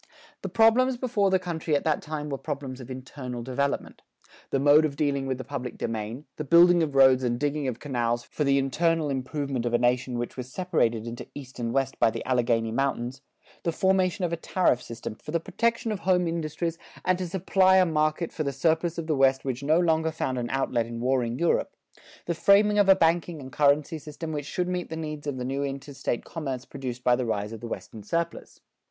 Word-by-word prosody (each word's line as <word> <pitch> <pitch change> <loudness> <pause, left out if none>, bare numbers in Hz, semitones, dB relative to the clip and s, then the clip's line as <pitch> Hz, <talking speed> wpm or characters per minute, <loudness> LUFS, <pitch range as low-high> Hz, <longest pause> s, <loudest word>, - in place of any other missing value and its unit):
The - - -4
problems 240 +3 +4
before 225 -6 +1
the 190 - +4
country 165 -4 -2
at 145 - 0
that 155 -2 +1
time 150 -1 -5
were 135 -2 -3
problems 140 -3 -5
of 125 - -10
internal 130 -1 -6
development: 140 +3 -2 0.5
the 135 - 0
mode 145 +3 +6
of 150 -3 -1
dealing 140 -2 0
with 130 -1 -1
the 130 - -6
public 130 -2 -5
domain; 115 +4 -4
the 155 - -3
building 170 +3 +6
of 150 -4 -1
roads 130 -1 +6
and 120 -1 0
digging 145 -1 -1
of 125 -3 -2
canals 120 -4 -1
for 150 - -3
the 140 -1 +3
internal 155 +3 +1
improvement 135 -1 -2
of 120 -1 0
a - - +5
nation 125 +1 +1
which 120 0 -4
was 125 0 -7
separated 125 - 0
into 120 0 -7
East 135 -3 -9
and 115 -1 -2
West 135 0 -1
by - - +5
the - - -6
Alleghany 115 -3 +1
Mountains; 130 0 -2 0.4
the 170 - 0
formation 185 +1 +1
of 170 - -2
a - - -1
tariff 165 -6 +1
system 115 -2 -7
for 110 - -14
the 170 +2 +1
protection 230 +5 -1
of 210 - -3
home 180 -2 +2
industries 165 0 -3 0.3
and 185 0 +2
to 180 -2 -3
supply 190 +1 +3
a 185 - +6
market 155 0 0
for - - -4
the 140 -2 0
surplus 160 +4 0
of 165 - -3
the 160 - 0
West 135 0 +3
which 130 -1 -2
no 155 +4 +3
longer 160 -2 +2
found 130 -5 -2
an 120 -1 -3
outlet 125 -3 0
in 115 0 -6
warring 125 -1 0
Europe; 170 +3 +1 0.5
the 170 - -1
framing 205 +5 +4
of 200 -1 +4
a 195 - +9
banking 165 -1 +1
and 135 -1 -9
currency 150 +2 +2
system 155 +2 -7
which 145 -2 -4
should 180 +3 -2
meet 180 -1 -3
the 160 - -4
needs 150 -2 -5
of 140 -2 -2
the 125 - -4
new 135 +2 -2
interstate 135 -3 -4
commerce 135 -6 -5
produced 125 -3 -6
by 125 - +4
the 125 - -2
rise 105 -1 -2
of 110 -2 -8
the 120 - -5
western 110 -1 -7
surplus. 170 +10 -3
145 Hz, 220 wpm, -26 LUFS, 125-170 Hz, 0.5 s, a